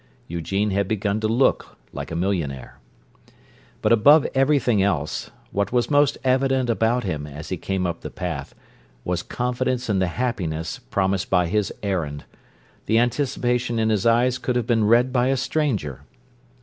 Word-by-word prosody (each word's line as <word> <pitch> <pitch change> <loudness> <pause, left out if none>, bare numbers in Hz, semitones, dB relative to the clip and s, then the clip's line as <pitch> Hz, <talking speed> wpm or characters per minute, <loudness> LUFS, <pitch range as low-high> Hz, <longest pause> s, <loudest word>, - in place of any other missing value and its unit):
Eugene 95 +5 -1
had 100 0 0
begun 105 0 -1
to 110 - 0
look 120 +5 +1 0.2
like - - -6
a 80 - -5
millionaire. 85 -8 -3 1.0
But - - +2
above 140 +7 +6
everything 135 -6 +3
else, 85 -7 -1 0.2
what 100 0 -1
was 125 +3 +1
most 145 -1 +3
evident 130 -1 +2
about 115 +2 +1
him, 75 -7 -3
as 75 +2 -9
he 95 - -1
came 95 +1 -2
up 85 -1 -3
the - - -6
path, 85 -7 -5 0.5
was 90 -1 -1
confidence 125 0 -2
in 95 - +1
the 95 - +1
happiness 90 -7 -3
promised 95 -1 -1
by 90 - +3
his 100 +3 0
errand; 80 -8 -2 0.6
the 110 - +3
anticipation 120 -1 0
in 110 0 +2
his 105 +1 +1
eyes 120 +2 +3
could 125 - -2
have 120 -3 0
been 115 -2 +2
read 120 +4 +4
by 125 -1 +2
a 135 0 +1
stranger. 130 - -1
110 Hz, 160 wpm, -23 LUFS, 90-125 Hz, 1.0 s, above